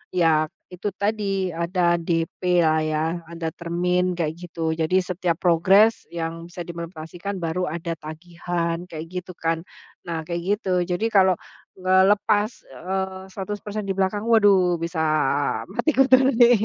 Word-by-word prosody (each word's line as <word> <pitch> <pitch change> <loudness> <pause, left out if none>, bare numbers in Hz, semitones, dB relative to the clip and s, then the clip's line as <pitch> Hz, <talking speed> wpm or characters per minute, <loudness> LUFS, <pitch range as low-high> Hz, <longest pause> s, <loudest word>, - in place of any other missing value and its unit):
ya 160 -3 +4 0.3
itu 180 +3 -5
tadi 200 -2 -1
ada 170 +1 +1
DP 170 +1 0
lah 160 -1 +3
ya 155 0 0 0.2
ada 165 0 -5
termin 180 +2 0
kayak 165 -3 -1
gitu, 165 -2 -3
jadi 160 +2 0
setiap 180 -2 -1
progres 190 +6 +4
yang 165 0 -5
bisa 175 0 -7
dimonetisasikan 170 +3 -6
baru 170 +3 -1
ada 170 +1 -4
tagihan 170 +2 -4
kayak 160 -2 -7
gitu 180 0 -5
kan. 165 0 -1 0.4
Nah 165 -1 -2
kayak 170 0 -2 0.2
gitu 190 - -3 0.2
jadi 180 +4 -1
kalau 190 -3 +5 0.4
ngelepas, 205 +3 +3 0.2
eee, 190 +6 -4
100% 205 +1 -5
di 195 - -1
belakang 195 +3 0
waduh 200 -6 +5
bisa 165 0 -4 0.7
mati 315 - +1
kutu 265 -1 +6 0.2
nih 240 -1 +6
180 Hz, 135 wpm, -23 LUFS, 165-195 Hz, 0.7 s, kutu